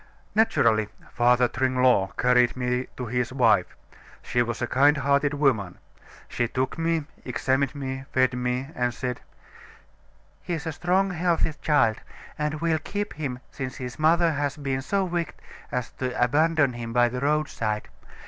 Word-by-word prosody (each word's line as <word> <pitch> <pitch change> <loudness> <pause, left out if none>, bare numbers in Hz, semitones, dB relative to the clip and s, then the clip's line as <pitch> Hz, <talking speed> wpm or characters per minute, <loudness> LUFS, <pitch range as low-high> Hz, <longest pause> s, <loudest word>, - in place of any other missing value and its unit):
"Naturally, 115 - +3 0.2
Father 125 +1 +3
Tringlot 125 -6 +2
carried 125 0 +3
me 125 0 -1
to 125 - -4
his 125 +2 -1
wife. 130 -1 +2 0.5
She 120 - +1
was 120 -2 -2
a 120 - 0
kind 140 +4 +4
hearted 140 +1 +1
woman. 120 -11 +1 0.5
She 120 - -1
took 130 +2 -2
me, 165 -2 0 0.2
examined 130 +2 0
me, 135 -1 -5
fed 130 -1 +2
me, 125 +2 -2
and 125 -1 -1
said: 125 -2 -4 1.2
'He's 165 -4 -4
a 160 - -2
strong, 185 +5 +1
healthy 170 -2 +1
child; 130 -8 +3 0.4
and 150 0 -2
we'll 165 -2 +1
keep 205 +6 -4
him 135 -4 -5
since 130 -3 -5
his 125 +1 -7
mother 165 +2 +4
has 145 -1 -2
been 135 -2 -2
so 195 +7 0
wicked 170 -2 -3 0.4
as 125 -4 -3
to 130 -1 -2
abandon 145 +2 +3
him 115 -1 -6
by 120 0 +4
the 125 +1 -4
roadside. 140 -7 -1
130 Hz, 150 wpm, -25 LUFS, 125-155 Hz, 1.2 s, kind